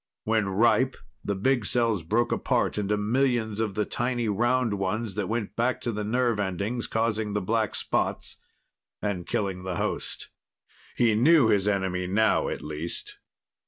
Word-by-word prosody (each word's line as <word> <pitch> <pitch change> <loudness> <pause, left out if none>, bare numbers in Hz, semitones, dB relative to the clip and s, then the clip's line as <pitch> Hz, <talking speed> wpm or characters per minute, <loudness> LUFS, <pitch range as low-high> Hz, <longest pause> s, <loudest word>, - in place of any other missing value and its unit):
When 110 -3 +1
"ripe", 120 +6 +3 0.3
the 100 - -1
big 120 +5 +1
cells 115 -2 +1
broke 110 +9 0
apart - - 0
into 105 +1 0
millions 115 -1 +1
of 110 -3 -1
the 105 - +1
tiny 120 -1 -1
round 120 +2 +1
ones 105 +2 -2
that 100 -1 -2
went 110 -3 -2
back 120 +2 +1
to 120 - -2
the 105 -1 -3
nerve 120 0 +1
endings, 100 +5 -2
causing 110 -2 -1
the 105 - +1
black 110 +3 0
spots - - -1 0.6
and 95 -4 -3
killing 95 -3 -1
the 95 -1 -4
host. - - -3 0.7
He 115 -2 +3
knew 130 +2 +5
his 100 -1 +2
enemy 95 -3 0
now, 110 +4 +2
at - - -5
least. 75 +3 -6
105 Hz, 160 wpm, -27 LUFS, 100-120 Hz, 0.7 s, knew